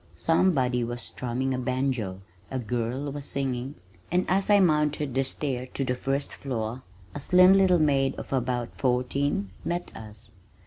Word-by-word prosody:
Somebody 135 -8 +2
was 120 +1 -4
strumming 130 +2 -3
a 130 - -2
banjo, 125 -7 -1 0.3
a 130 - -3
girl 125 +4 -2
was 145 0 -6
singing, 135 0 -2 0.4
and 180 +1 +2
as 190 +2 +1
I 205 -1 +6
mounted 150 -5 +2
the 135 +1 +2
stair 130 -1 -3
to 135 - -1
the 125 - 0
first 135 +3 -2
floor, 120 -2 -4 0.3
a - - -5
slim 180 +6 +6
little 190 -2 +5
maid 140 -4 +2
of - - -7
about 125 -2 -1
fourteen 125 -4 0
met 175 +1 -3
us. 105 -1 -11
135 Hz, 160 wpm, -27 LUFS, 125-145 Hz, 0.4 s, I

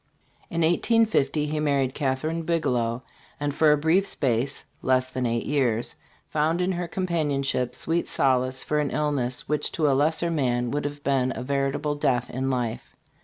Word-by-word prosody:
In 170 - -1
1850 165 - +2
he 150 +1 -2
married 140 -3 +1
Catherine 150 +4 -1
Bigelow, 125 -8 0 0.4
and 145 -1 -1
for 155 +1 +4
a 150 - +4
brief 165 +6 +2
space 130 +1 0 0.2
(less 130 0 +1
than 130 -1 -1
eight 115 0 -1
years) 120 -5 0 0.3
found 155 +3 0
in 180 +1 +1
her 175 -1 -3
companionship 145 -8 -1
sweet 170 +1 -1
solace 130 -1 +1
for 150 - 0
an 145 -2 0
illness 140 -5 -1
which 150 0 0
to 155 -3 +1
a 140 - +4
lesser 160 +5 +1
man 125 -6 0
would 145 0 -2
have 145 0 -5
been 130 -2 +1
a - - -5
veritable 140 +2 -1
death 125 -4 0
in 130 +1 -2
life. 120 -4 -3
140 Hz, 170 wpm, -25 LUFS, 130-155 Hz, 0.4 s, for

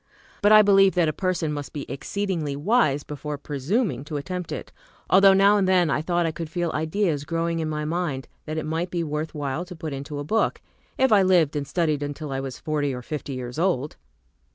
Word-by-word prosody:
But 205 - +4
I 215 0 +9
believed 195 -1 +5
that 175 -2 +3
a 155 - 0
person 175 -3 -1
must 145 -1 -6
be 145 - -5
exceedingly 165 -2 -3
wise 150 - +2
before 150 0 -5
presuming 150 - -1
to 150 -1 -4
attempt 180 +4 -5
it: - - -6 0.4
although 195 0 +7
now 200 +2 +5
and 195 -2 +2
then 180 -4 +3
I 150 - +1
thought 175 +1 0
I 165 - 0
could 165 0 -6
feel 175 0 -1
ideas 160 -1 0
growing 165 +2 -1
in 160 -1 -2
my 150 0 -3
mind 155 -5 -2 0.2
that 155 +1 -3
it 155 - -2
might 165 +3 -2
be 175 -1 -2
worth 155 +1 -4
while 145 +2 -2
to 180 0 -10
put 160 -2 -5
into 140 +2 -6
a 145 - -3
book, 220 +10 0 0.4
if 265 -2 +3
I 205 -2 +6
lived 175 -6 +3
and 145 -1 -2
studied 155 -4 0
until 145 0 -5
I 135 - -2
was 135 -1 -5
forty 145 -3 -1
or 125 - -7
fifty 145 0 -5
years 125 +3 -5
old. 165 -6 0
160 Hz, 220 wpm, -24 LUFS, 145-185 Hz, 0.4 s, I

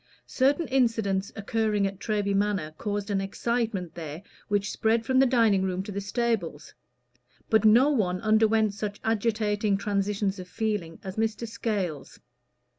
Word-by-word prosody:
Certain 285 +5 +1
incidents 225 -7 +1
occurring 215 -1 0
at 195 -1 -4
Treby 205 -2 -1
Manor 195 -6 0
caused 205 -1 -3
an 195 -1 +1
excitement 205 -3 -2
there 160 +1 -7 0.2
which 205 -1 0
spread 225 +1 +1
from 260 +2 +3
the 270 - +6
dining 225 -6 +3
room 185 0 -1
to 205 - -7
the 200 0 -3
stables; 200 - -2 0.8
but 220 0 +4
no 240 +7 +6
one 185 -9 0
underwent 220 -1 +3
such 205 0 -5
agitating 215 -2 +1
transitions 200 0 -1
of 180 - -8
feeling 205 -6 -3
as 190 0 -7
Mr. 225 +1 -1
Scales. 195 - -3
210 Hz, 145 wpm, -27 LUFS, 195-225 Hz, 0.8 s, the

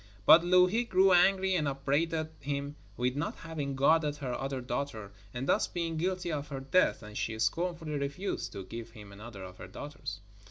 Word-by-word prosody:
But 160 +9 +9
Louhi 180 +6 +4
grew 190 -4 +4
angry 190 +1 +4
and 155 -5 +1
upbraided 150 +4 0
him 140 +1 -3 0.2
with 125 +1 0
not 145 +3 -2
having 150 -4 -4
guarded 150 +2 +3
her 135 -4 -4
other 135 +1 -3
daughter, 120 -4 -4 0.2
and 125 +4 -4
thus - - +3
being 165 -2 -3
guilty 180 +1 -1
of 145 -2 -3
her 140 -2 -5
death, 135 0 +2
and 105 0 -10
she 110 0 -2
scornfully 165 +3 -1
refused 140 +8 -3
to 95 - -6
give 115 +2 -7
him 105 -3 -12
another 100 -1 -9
of 90 -1 -10
her - - -9
daughters. 145 -9 -7
145 Hz, 185 wpm, -31 LUFS, 125-170 Hz, 0.2 s, But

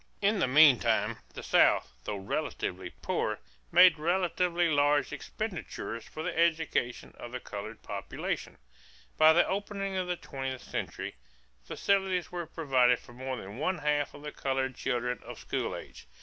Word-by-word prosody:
In 205 +1 +2
the 180 - +2
meantime, 140 -2 +5 0.2
the - - -7
South, - - +4
though 105 - -2
relatively 95 - -3
poor, - - 0 0.3
made 180 -3 +7
relatively 175 +1 +1
large 145 -1 +2
expenditures 180 - -5
for 155 - -7
the - - -3
education 160 -7 0
of 120 - -8
the 125 - -4
colored 110 0 -7
population. - - -4 0.6
By 155 0 +8
the 175 - +4
opening 195 0 -3
of 185 -1 -1
the 180 - 0
twentieth 135 -4 -5
century, - - -5 0.5
facilities 190 - 0
were 175 -2 -4
provided 130 -6 +3
for 120 - -15
more 130 +1 -4
than 105 +2 -8
one 180 +5 0
half 145 -1 0
of 145 - -12
the 150 - -5
colored 135 -2 -1
children 125 -1 -1
of - - -9
school - - -3
age. - - -10
150 Hz, 150 wpm, -30 LUFS, 125-180 Hz, 0.6 s, By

